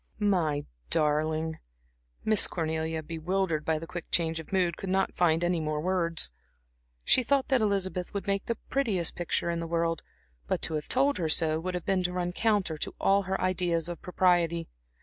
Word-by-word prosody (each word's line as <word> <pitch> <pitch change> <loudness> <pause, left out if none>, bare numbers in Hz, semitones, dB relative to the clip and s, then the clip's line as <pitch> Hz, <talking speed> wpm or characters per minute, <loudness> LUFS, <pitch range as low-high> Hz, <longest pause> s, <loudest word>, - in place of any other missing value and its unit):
"My 175 -9 +1 0.2
darling." 155 +1 +1 0.7
Miss 215 -2 +6
Cornelia, 160 -1 -2
bewildered 165 0 -1
by 160 0 +1
the 160 - -6
quick 175 0 -7
change 165 -1 +1
of 160 - -10
mood, 180 -3 +1
could 195 - -6
not 190 +1 +1
find 165 -1 +3 0.2
words. 165 - 0 0.7
She - - +5
thought 270 +2 +1
that 260 -3 +3
Elizabeth 190 -3 0
would 200 - -4
make 200 0 0
the 235 - -1
prettiest 215 -11 0
picture 170 0 -1
in 170 - -2
the 165 - -4
world; 165 -1 0 0.5
but - - 0
to - - +1
have 150 -1 -3
told 275 -3 +2
her 165 -3 0
so 155 0 +3
would 180 +2 -3
have 180 - -4
been 195 -1 +2
to 180 0 0
run 180 -1 -1
counter 200 -6 0
to - - -4
all 195 +1 +4
her 190 - 0
ideas 175 -3 0
of 175 -1 -6
propriety. 175 -2 +2
175 Hz, 180 wpm, -29 LUFS, 160-190 Hz, 0.7 s, Miss